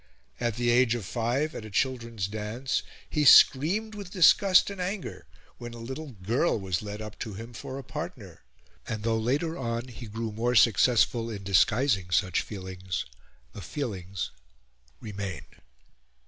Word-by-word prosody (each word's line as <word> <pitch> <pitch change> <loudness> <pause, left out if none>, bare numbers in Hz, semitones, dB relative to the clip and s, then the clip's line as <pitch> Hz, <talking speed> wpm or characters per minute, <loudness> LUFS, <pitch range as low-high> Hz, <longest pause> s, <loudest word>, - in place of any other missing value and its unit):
At 120 -3 -1
the 120 0 +1
age 120 -1 +4
of 115 -5 -5
five, 125 - -1
at - - -6
a 110 - -8
children's 115 -2 -1
dance, 110 +5 -2 0.3
he 150 - 0
screamed 175 +11 +6
with 200 -3 -8
disgust 190 +1 +5
and 195 -2 -6
anger 190 +2 -5 0.3
when 120 -1 -7
a - - -9
little 130 +5 -7
girl 115 - +1
was 95 -3 -2
led 105 0 -6
up 105 0 -9
to 110 -3 -5
him 115 +4 -8
for 130 +3 -7
a 135 - -6
partner; - - -7 0.5
and 110 -1 -4
though, 115 0 +1
later 145 +9 0
on, 120 0 -3
he 120 -1 -9
grew 110 +1 -4
more 120 +3 -1
successful 115 +1 +4
in 100 -3 -6
disguising 100 0 +2
such 90 -2 +2
feelings, 95 -2 -5 0.5
the 100 - -8
feelings 95 - -4 0.7
remained. 95 -9 -7
115 Hz, 155 wpm, -28 LUFS, 105-130 Hz, 0.7 s, screamed